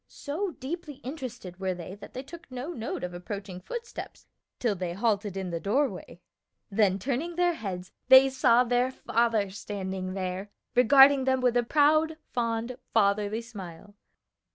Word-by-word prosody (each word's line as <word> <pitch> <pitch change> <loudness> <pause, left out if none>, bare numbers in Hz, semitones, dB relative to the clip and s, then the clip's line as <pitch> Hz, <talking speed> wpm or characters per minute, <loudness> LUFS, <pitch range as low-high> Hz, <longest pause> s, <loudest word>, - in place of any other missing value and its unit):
So 340 +6 -4
deeply 300 +2 -5
interested 250 - -7
were 190 -1 -1
they 175 +1 -8
that 205 - -12
they 255 - -4
took 335 +4 -12
no 255 +6 -5
note 225 - -4
of 180 0 -4
approaching 185 +1 -6
footsteps 465 - -7 0.3
till 235 -4 +1
they 180 -2 -3
halted 205 -1 0
in 190 -2 -3
the 170 - -2
doorway, 200 - -1 0.5
then 195 -2 +3
turning 275 - -2
their 350 0 +3
heads 185 - -6 0.2
they 265 +1 +9
saw 255 -2 +4
their 245 +1 +2
father 230 -5 0
standing 190 -2 -5
there, 190 +1 -3 0.2
regarding 270 +2 +7
them 260 0 +2
with 250 -1 +2
a 245 - +5
proud, 310 +5 +3
fond 235 +1 -2 0.2
fatherly 210 +1 +2
smile. 200 -4 -10
230 Hz, 155 wpm, -28 LUFS, 195-265 Hz, 0.5 s, they